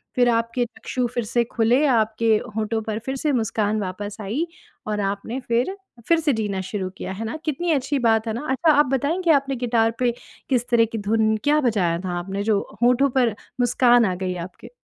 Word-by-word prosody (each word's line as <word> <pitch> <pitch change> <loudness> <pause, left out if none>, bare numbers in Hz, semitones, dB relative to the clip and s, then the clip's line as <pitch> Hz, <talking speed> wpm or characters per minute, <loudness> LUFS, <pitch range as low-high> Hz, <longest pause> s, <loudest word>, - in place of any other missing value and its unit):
फिर 245 -1 +4
आपके 235 +1 0
चक्षु 250 +2 -4
फिर 240 - -1
से 235 +2 +1
खुले 240 +5 +2
आपके 225 -2 +1 0.3
होंठों 220 0 -1
पर 220 0 -3
फिर 265 0 -2
से 295 +2 0
मुस्कान 215 -2 0
वापस 200 +3 -5
आई 235 - -2 0.4
और 210 -1 -1
आपने 200 +6 -3
फिर, 250 +9 -1 0.3
फिर 335 -1 +4
से 300 -4 +1
जीना 205 -4 -2
शुरू 190 0 -4
किया। - - -5
है 225 +4 -5
ना? 230 +8 -4
कितनी 325 +3 -1
अच्छी 280 -1 0
बात 225 -1 +2
है 220 - -1
ना? 245 +6 -5
अच्छा 310 +4 +3
आप 295 +1 +5
बताएँ 290 +8 0
आपने 275 -1 0
गिटार 230 -2 +1
पे 245 -1 +2 0.4
किस 245 -2 +1
तरह 230 -1 +4
की 225 - -3
धुन, 220 +1 +1
क्या 300 +1 +3
बजाया 185 -9 +1
था 175 -1 -2
आपने? 195 +3 -4
जो 210 -2 +2 0.2
होंठों 250 +3 +4
पर 245 -4 +1 0.3
मुस्कान 245 -1 +4
आ 185 -2 0
गई 185 0 -3
आपके? 175 - -9
230 Hz, 200 wpm, -23 LUFS, 210-255 Hz, 0.4 s, आप